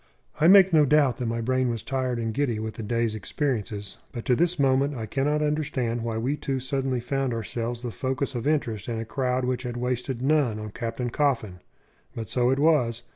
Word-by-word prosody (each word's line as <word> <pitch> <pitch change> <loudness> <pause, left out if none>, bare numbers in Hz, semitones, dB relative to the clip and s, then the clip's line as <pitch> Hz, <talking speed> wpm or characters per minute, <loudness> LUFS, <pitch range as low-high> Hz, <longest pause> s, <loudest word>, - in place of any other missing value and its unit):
I 155 - +5
make 190 -1 +7
no 155 -2 +6
doubt 145 -2 +3
that 125 -3 -2
my 115 0 -1
brain 130 +1 +1
was 115 -2 -3
tired 130 -2 -1
and 115 -1 -2
giddy 130 -4 0
with 110 0 -4
the - - -7
day's 115 +1 0
experiences, 110 -3 -3
but 120 - -6
to 125 - +3
this 175 +5 +1
moment 140 0 +2
I 115 -3 -4
cannot 150 +5 0
understand 140 -6 -1
why 115 -1 -2
we 125 +6 0
two 135 -2 -2
suddenly 130 0 -1
found 130 0 -1
ourselves 115 +1 -3
the 120 - -3
focus 130 +3 -2
of 120 +1 -3
interest 120 -9 -1
in 115 - -2
a 115 - -4
crowd 125 +1 -1
which 125 0 -1
had 120 -2 -5
wasted 125 0 -2
none 140 -6 +2
on 105 -1 -6
Captain 115 +2 -4
Coffin. 115 -11 0 0.6
But 115 -2 -5
so 125 -1 +2
it 135 - +2
was. 130 -7 +2
125 Hz, 210 wpm, -26 LUFS, 115-140 Hz, 0.6 s, make